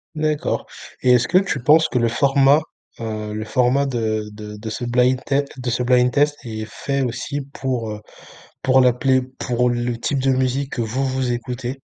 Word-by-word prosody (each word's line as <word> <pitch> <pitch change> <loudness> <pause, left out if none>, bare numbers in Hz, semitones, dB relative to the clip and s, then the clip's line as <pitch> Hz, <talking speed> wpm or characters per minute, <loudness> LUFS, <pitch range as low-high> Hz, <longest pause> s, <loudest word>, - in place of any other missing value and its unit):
D'accord. 155 -1 -1 0.4
Et 125 - +4
est-ce 125 -1 +4
que 185 - +3
tu 180 -9 0
penses 155 +4 +5
que 125 - 0
le 115 - +2
format, 140 +4 +4 0.4
heu 110 -2 -4
le 110 0 -4
format 130 +4 +2
de 110 -4 -1
de 105 0 -9
de 110 +1 -6
ce 115 - -5
blind 125 +2 +2
tête, 140 0 0
de 125 -1 -3
ce 120 +1 0
blind-test, 125 +4 +3
est 110 -2 -5
fait 140 +5 -3
aussi 130 +4 -3
pour, 125 -5 -2
heu 105 0 -7 0.6
pour 130 0 +4
la 125 -1 +5
play 130 +1 +2 0.2
pour 125 0 +1
le 120 0 -1
type 140 +3 -1
de 135 0 +2
musique 130 +1 0
que 120 - -1
vous, 130 +5 -1
vous 130 -1 -1
écoutez? 125 +2 -4
125 Hz, 190 wpm, -21 LUFS, 120-135 Hz, 0.6 s, penses